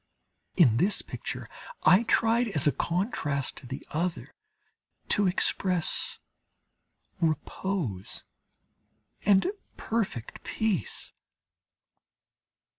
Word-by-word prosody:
In 125 - +6
this 195 - +2
picture, - - -6 0.4
I 185 - +7
tried, 230 +1 +3
as 155 -10 +2
a 145 - +5
contrast 160 - -1
to - - -11
the 135 - -6
other, 170 +3 -2 0.8
to 205 -1 +4
express 180 -1 +1 1.0
repose 155 - -2 1.0
and 195 -1 +5 0.3
perfect 205 - -3
peace. 220 -5 -1
180 Hz, 80 wpm, -28 LUFS, 145-205 Hz, 1.0 s, I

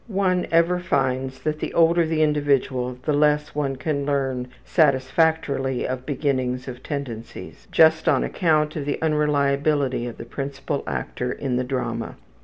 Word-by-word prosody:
One 190 -4 0
ever 170 +2 +3
finds 130 -6 -1
that 155 0 -1
the - - -4
older 170 0 +4
the 155 -1 +1
individual 140 -4 +1
the 150 - 0
less 150 +1 +2
one 140 -2 -1
can 140 +1 -2
learn 135 -3 -1 0.2
satisfactorily 140 -2 +1
of 130 0 -5
beginnings 130 -3 -1
of 125 -1 -7
tendencies, 130 -7 -7
just 160 0 +5
on - - +3
account 155 -3 +1
of 145 - -3
the 145 - -2
unreliability 145 -3 +1
of 120 - -7
the - - -8
principal 140 +3 -4
actor 125 0 -3
in 130 -2 -2
the 125 - 0
drama. 130 0 -3
140 Hz, 150 wpm, -23 LUFS, 130-155 Hz, 0.2 s, just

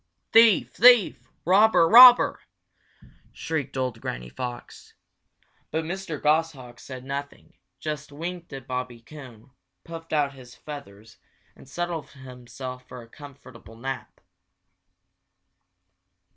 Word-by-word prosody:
"Thief! 225 -3 +4
thief! 245 -4 +4 0.2
robber! 190 -2 +4
robber!" 245 +4 +8 0.9
shrieked 155 -5 -5
old 125 -4 -3
Granny - - -6
Fox. 120 - -9 0.7
But 160 +1 -3
Mr. 170 -2 -6
Goshawk 150 -6 -1
said 130 -2 -10
nothing, 140 +1 -7 0.3
just 150 -1 -6
winked 170 +3 -7
at 135 -3 -9
Bobby 125 -2 -5
Coon, 125 -1 -14 0.3
puffed 165 0 -11
out 145 -2 0
his 125 -2 -15
feathers, 115 -7 -12 0.4
and 135 - -18
settled 175 +1 -5
himself 125 -1 -10
for 125 -2 -11
a - - -17
comfortable 130 -5 -15
nap. 130 +3 -7
140 Hz, 105 wpm, -24 LUFS, 125-165 Hz, 0.9 s, robber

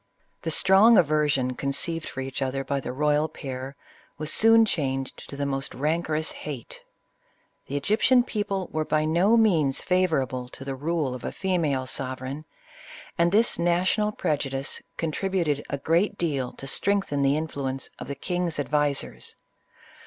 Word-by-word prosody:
The 165 - -3
strong 195 +7 +6
aversion 145 -5 +2
conceived 145 +5 -1
for 135 - -5
each 135 +1 -4
other 135 0 -1
by 140 +1 -1
the 125 - -5
royal 150 +3 +2
pair 130 0 -6 0.4
was 155 0 -2
soon 225 0 +6
changed 135 -8 -3
to 140 - -7
the 140 - -1
most 135 0 -3
rancorous 155 +2 0
hate. 140 -6 -8 0.9
The 140 - -2
Egyptian 220 - +3
people 205 -5 -2
were 155 0 0
by 155 0 +1
no 180 +8 +4
means 160 -12 +3
favor 180 -6 +2
able 125 -1 -6
to 135 - -10
the 135 - -3
rule 150 0 -1
of 125 - -7
a - - -3
female 160 -9 0
sovereign, 130 +3 -4 0.7
and 170 0 +4
this 220 0 +3
na 175 +1 +2
tional 210 +3 +1
prejudice 135 -2 -2 0.2
contributed 165 -2 -1
a 140 - -2
great 170 +8 +1
deal 140 -7 -1
to - - -9
strengthen 195 0 0
the 140 +1 +3
influence 140 -4 -3
of - - -7
the 140 - -4
king's 175 +1 -2
advisers. 145 0 -1
150 Hz, 155 wpm, -26 LUFS, 135-175 Hz, 0.9 s, strong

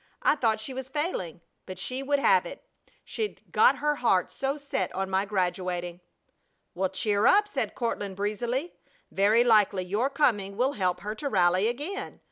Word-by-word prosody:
I - - +5
thought 225 -6 +1
she 240 +5 -6
was 260 0 -6
failing! 265 - -3 0.3
But 185 -1 -7
she 255 +8 -4
would 285 +1 +1
have 470 +11 +4
it! - - -10 0.4
She'd 435 -2 -4
got 475 +3 +5
her 295 0 0
heart 190 -7 +2
so 275 +2 -2
set 280 -2 -3
on 195 0 -2
my 190 +1 +1
graduating!" 180 -2 -2 0.7
"Well, 190 +1 -1
cheer 205 +3 +1
up!" 415 +5 +5
said 415 - -3
Courtland, 205 -5 -3
breezily. 235 - -2 0.4
"Very 210 +4 +4
likely 210 -5 +3
your 210 +9 0
coming 205 -9 0
will 260 +4 +1
help 185 -5 -1
her 210 +1 -4
to 280 +6 -4
rally 185 -1 +3
again! 295 +12 -4
220 Hz, 170 wpm, -27 LUFS, 190-280 Hz, 0.7 s, I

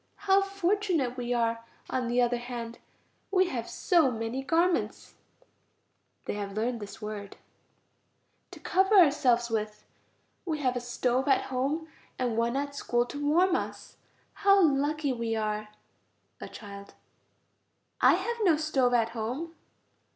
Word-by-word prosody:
How 390 0 +5
fortunate 390 -8 0
we 245 -1 -4
are, 230 -1 0 0.2
on 255 -2 -2
the 245 +1 +2
other 240 0 0
hand! 235 -1 -7 0.5
We 370 -2 +2
have 235 -3 -4
so 335 -7 +3
many 225 +2 -3
garments 335 +5 0 1.1
(they - - -3
have 200 -1 -5
learned 230 +3 -1
this 205 +1 -9
word) 210 -2 -6 1.1
to - - -12
cover 385 +3 +2
ourselves 255 -8 +4
with; 215 -1 -3 0.6
we 320 -4 -2
have 255 -4 0
a - - 0
stove 245 +2 -1
at 270 - +3
home 285 +6 -1 0.3
and 245 -3 -1
one 235 +2 0
at 285 0 -3
school, 240 -3 0
to 290 +3 -6
warm 350 +5 +3
us. - - -5 0.4
How 395 0 +4
lucky 290 -1 +1
we 230 -2 -2
are! 215 -1 -2 0.7
A - - -7
child. 200 -2 -11 1.1
I - - +6
have 470 0 -3
no 340 -6 +4
stove 270 -5 +1
at 230 -1 +2
home. 245 +9 -4
250 Hz, 140 wpm, -28 LUFS, 230-315 Hz, 1.1 s, I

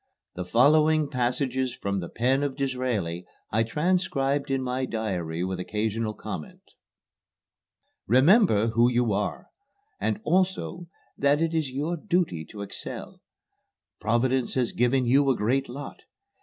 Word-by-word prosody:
The 90 - -5
following 150 - +4
passages 130 0 -1
from 100 0 -2
the 85 - -5
pen 130 +4 +1
of 140 -2 -2
Disraeli 125 - -2 0.3
I 110 - +2
transcribed 145 0 0
in 135 -1 0
my 130 +1 -1
diary 90 -8 -3
with 95 0 -3
occasional 110 +3 -2
comment. - - -7 1.4
"Remember 130 - +5
who 120 +2 +4
you 120 -3 +1
are, 105 +1 -3 0.5
and 110 -1 -1
also 180 0 0 0.3
that 140 +1 +3
it 165 0 0
is 160 -4 0
your 150 +7 -2
duty 170 - 0
to 100 +4 -8
excel. 100 - -6 0.8
Providence 120 +3 +1
has 125 -3 +1
given 125 +2 +2
you 135 +3 +4
a 130 - +3
great 130 +6 0
lot. 140 +4 -8
130 Hz, 130 wpm, -26 LUFS, 110-145 Hz, 1.4 s, Remember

